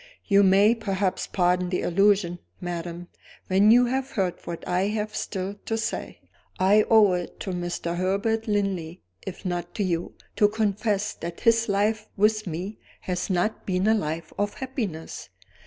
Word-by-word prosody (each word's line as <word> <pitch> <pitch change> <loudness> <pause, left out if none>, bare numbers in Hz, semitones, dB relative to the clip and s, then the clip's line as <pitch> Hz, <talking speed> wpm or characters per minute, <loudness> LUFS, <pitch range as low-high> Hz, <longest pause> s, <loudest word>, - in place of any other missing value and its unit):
"You 200 -2 +5
may 200 +3 +5
perhaps 195 -4 -1
pardon 180 -1 +1
the 180 - -1
allusion, 195 -1 +2 0.2
madam, 175 0 -5 0.4
when 195 +3 +4
you 245 +2 +7
have 260 +2 -1
heard 190 -8 0
what 170 -1 -6
I 180 +2 +1
have 215 0 -3
still 195 0 -4
to 225 - 0
say. 225 +1 -4 0.4
I 205 +3 +5
owe 215 -4 +6
it 175 -1 -4
to 190 - -3
Mr. 175 -1 -3
Herbert 200 +5 0
Linley, 195 -5 -2 0.2
if 190 +1 -7
not 175 -1 -3
to 210 - 0
you, 175 -2 -2 0.2
to 210 - +6
confess 210 -1 0
that 170 0 -7
his 230 -1 +3
life 215 +2 +1
with 215 +1 +2
me 180 +6 -5 0.2
has 180 +1 -3
not 190 +4 -1
been 185 0 0
a 220 - +5
life 165 -6 -3
of 205 0 -1
happiness. 225 - -5
195 Hz, 160 wpm, -25 LUFS, 180-215 Hz, 0.4 s, you